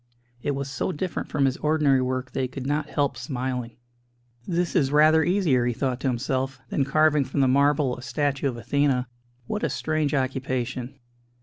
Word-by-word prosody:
It 145 +1 -1
was 140 0 -3
so 140 - -2
different 180 +2 -4
from 140 - +1
his 130 0 +1
ordinary 150 -3 +2
work 130 0 -2
that - - -2
he 130 - 0
could 130 0 -7
not 145 +2 -1
help 140 -3 0
smiling. 125 -1 -4 0.7
"This 175 0 -1
is 140 -6 +3
rather 155 +2 +5
easier," 175 -10 +2
he 120 - 0
thought 130 0 -2
to 135 - -2
himself, 130 +1 -1
"than 140 - +1
carving 150 +1 +3
from 135 +2 -1
the 135 - +4
marble 140 0 +3
a - - -10
statue 140 +1 -1
of 120 - -6
Athena. 130 +1 +1 0.4
What 210 - -3
a - - 0
strange 155 -2 -1
occupation!" 130 -1 -2
135 Hz, 185 wpm, -25 LUFS, 130-150 Hz, 0.7 s, rather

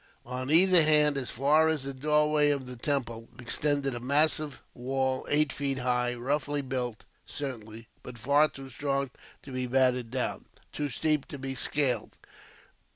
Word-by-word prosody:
On 130 +2 -5
either 180 +2 +7
hand, 150 -1 +3
as 135 -3 -3
far 150 +6 +3
as 160 -4 0
the 140 0 -5
doorway 150 +2 +2
of 140 -2 -1
the 125 0 -8
temple, 120 -3 -2
extended 135 +3 0
a 120 - -5
massive 150 +3 +1
wall, 130 +1 -2
eight 150 -1 +2
feet 140 -2 -2
high; 125 -1 0
roughly 145 +3 -2
built, 125 -4 -4 0.2
certainly, 115 -5 -7
but 125 -1 -10
far 140 +6 +3
too 135 -2 -10
strong 140 0 -2 0.3
to 135 - -11
be 130 -1 -3
battered 125 -2 +2
down, 130 +1 -3 0.3
too 145 -1 -3
steep 150 +3 -1
to - - -8
be 135 0 -5
scaled. 130 -3 0
135 Hz, 155 wpm, -28 LUFS, 125-145 Hz, 0.3 s, either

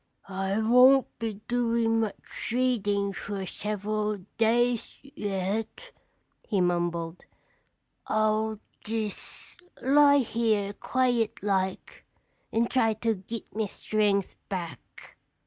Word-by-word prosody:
"I 195 +1 -2
won't 250 +4 +6
be 220 -3 -4
doin' 230 -2 +2
much 220 -3 -4
readin' 205 -5 +1
fer 195 0 -5
several 210 +2 -2 0.2
days 235 +1 +2
yet," 210 - -3 0.5
he 205 - -1
mumbled. 175 -1 -1 0.8
"I'll 215 0 +1 0.3
jes' 220 -2 -4 0.2
lie 285 +2 +6
here 220 -5 +1
quiet 245 -3 0
like 190 -2 -1 0.5
and 230 +1 +2
try 225 -4 +2
to 225 +1 0
git 215 +4 -8
me 215 -1 0
strength 205 -2 0
back." 170 -9 -7
215 Hz, 95 wpm, -28 LUFS, 200-235 Hz, 0.8 s, won't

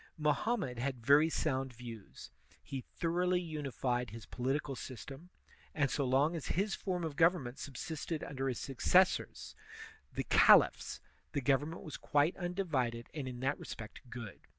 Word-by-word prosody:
Mohammed 150 - 0
had 125 -2 -3
very 150 +4 +6
sotmd 135 -5 -1
views; 115 -3 -10 0.3
he 135 -2 -5 0.2
thor 165 -2 0
oughly 180 0 +3
unified 135 -7 -2
his 115 +2 -9
political 135 +3 -2
system; 135 - -8 0.5
and 145 -3 +2
so 140 - 0
long 140 +6 +3
as 160 - -5
his 195 +3 0
form 180 -3 -2
of 160 -3 -3
government 155 -6 +2
subsisted 155 +3 -4
under 135 -1 -3
his 125 -3 -1
successors, 180 +8 +2 0.6
the - - -2
caliphs, - - +5 0.3
the 140 - 0
government 145 +5 +1
was 155 -5 -6
quite 145 +4 +2
undivided 160 -11 -1
and 145 -4 -4
in 125 -1 -6
that 135 +2 0
respect 110 -1 -8
good. 115 -4 -8
140 Hz, 150 wpm, -34 LUFS, 125-160 Hz, 0.6 s, very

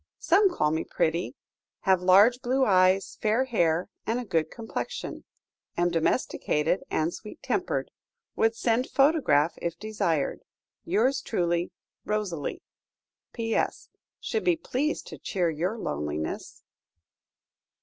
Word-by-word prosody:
Some 390 +4 +4
call 150 - +1
me 160 +1 0
pretty. 160 -5 -1 0.5
Have 190 -2 +3
large 205 +7 +6
blue 260 +1 +2
eyes, 185 -1 +3
fair 220 +4 +2
hair, 175 -8 +1 0.2
and 230 +2 0
a 250 - -5
good 165 -6 0
complexion. 225 -2 -5 0.5
Am 175 0 +2
domesticated 165 -1 0
and 160 +2 0
sweet 210 - -10
tempered. - - -1 0.4
Would 225 0 +2
send 235 +2 0
photograph 270 - +3
if 170 0 -3
desired. 185 -9 -1 0.5
"Yours 250 +9 +2
truly, 175 -7 0 0.3
ROSALIE." 205 -8 -3 0.7
"PS. 225 -1 -1 0.3
Should 440 - -2
be 355 - +3
pleased 300 -2 -2
to - - -10
cheer 175 -3 0
your 180 +8 -2
loneliness." 75 - -4
195 Hz, 120 wpm, -27 LUFS, 165-240 Hz, 0.7 s, large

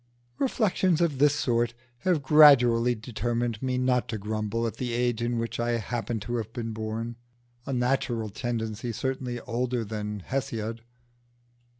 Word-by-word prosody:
Reflections 190 - +2
of 160 -6 +1
this 145 0 +5
sort 120 -4 +1 0.2
have 170 -1 +1
gradually 125 -5 +6
determined 115 0 -2
me 130 -1 0
not 125 -1 +1
to 110 - -2
grumble 110 +2 -2
at 115 - -3
the 125 -2 -3
age 120 -1 0
in 120 0 0
which 115 0 -3
I 120 0 +1
happen 115 0 -2
to 120 +4 -2
have 110 -1 -4
been 115 -2 -4
born 110 +2 -4 0.5
a - - -2
natural 125 -3 0
tendency 115 0 -3
certainly 130 0 -3
older 125 -1 -2
than 105 -2 -4
Hesiod. 115 -4 -3
120 Hz, 150 wpm, -27 LUFS, 115-125 Hz, 0.5 s, gradually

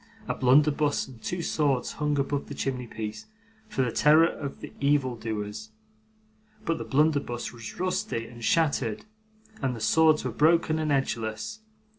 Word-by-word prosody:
A - - 0
blunderbuss 145 +3 +3
and 125 -4 -13
two 175 -1 -3
swords 140 -7 0
hung 150 -1 -1
above 140 0 -1
the 145 - -7
chimney 125 -3 -3
piece, 110 -1 -6 0.4
for 135 -11 0
the 120 - -1
terror 155 +5 +6
of 140 -4 -4 0.2
evil 140 -3 +2
doers, 110 -1 -5 1.0
but 165 - 0
the - - -3
blunderbuss 145 -5 0
was 115 -2 -9
rusty 135 -10 -1
and 120 0 -11
shattered, 145 -8 +1 0.6
and 130 -3 0
the - - -7
swords 155 +8 +4
were - - -1
broken 160 0 +3
and 155 -1 0
edgeless. 115 - -2
135 Hz, 150 wpm, -27 LUFS, 115-150 Hz, 1.0 s, terror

